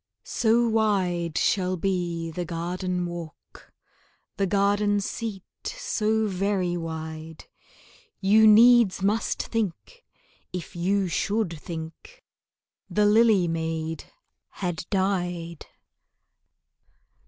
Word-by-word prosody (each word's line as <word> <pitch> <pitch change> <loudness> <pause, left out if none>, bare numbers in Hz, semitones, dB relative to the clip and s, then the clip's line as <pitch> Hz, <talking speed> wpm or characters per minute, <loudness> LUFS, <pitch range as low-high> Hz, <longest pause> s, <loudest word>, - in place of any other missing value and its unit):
So 235 +1 +2
wide 185 -7 0
shall 185 -1 +1
be 170 -3 -2
the 175 +2 -4
garden 180 +2 -3
walk, 170 -2 -9 0.7
The 195 - +1
garden 205 +1 +2
seat 200 -1 -4 0.2
so 220 - -1
very 190 -2 -1
wide, 160 -1 -6 0.7
You 215 +3 +5
needs 225 -3 +6
must 210 +3 0
think 225 - -4 0.5
if 180 -1 -7
you 190 +3 +1
should 200 +1 -1
think 165 - -9 0.6
The 210 0 +2
lily 210 -3 +4
maid 160 -1 -3 0.4
had 175 -3 -4
died. 180 -4 -2
185 Hz, 90 wpm, -25 LUFS, 170-210 Hz, 0.7 s, needs